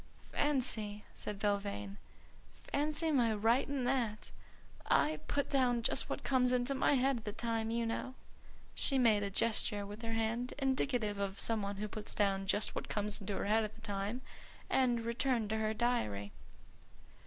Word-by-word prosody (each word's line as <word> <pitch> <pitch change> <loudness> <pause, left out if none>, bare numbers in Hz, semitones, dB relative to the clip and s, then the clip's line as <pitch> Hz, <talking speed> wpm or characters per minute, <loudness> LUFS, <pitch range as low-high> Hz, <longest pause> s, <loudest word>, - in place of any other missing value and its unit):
"Fancy!" 230 -8 0
said 210 - -5
Belvane. 200 0 -2 0.8
"Fancy 305 +2 +1
my 235 -6 +3
writing 245 +5 +2
that! 245 -4 -1 0.6
I 310 - +3
put 285 -1 0
down 250 -4 +2
just - - +2
what - - -3
comes 255 -2 +3
into 250 +2 +1
my 270 - +3
head 265 0 +2
at 230 - -8
the 210 - -2
time, 225 0 -2
you 230 0 0
know." 240 +3 -3 0.6
She 275 - 0
made 225 -5 +4
a 200 - -1
gesture 205 0 +1
with 205 +2 -8
her 225 -1 -3
hand 225 +2 -1
indicative 255 -6 0
of 200 0 -2
some 225 -2 +1
one 200 0 -3
who 210 +2 -3
puts 215 0 -5
down 195 -2 +1
just 205 +2 +1
what - - -5
comes 210 0 0
into 195 0 -3
her - - -2
head 220 +2 +3
at 215 - -5
the 225 - -15
time, 205 +3 -3 0.5
and 245 -3 +3
returned 235 -1 0
to 220 - +1
her 215 0 +1
diary. 105 - 0
225 Hz, 170 wpm, -34 LUFS, 205-250 Hz, 0.8 s, made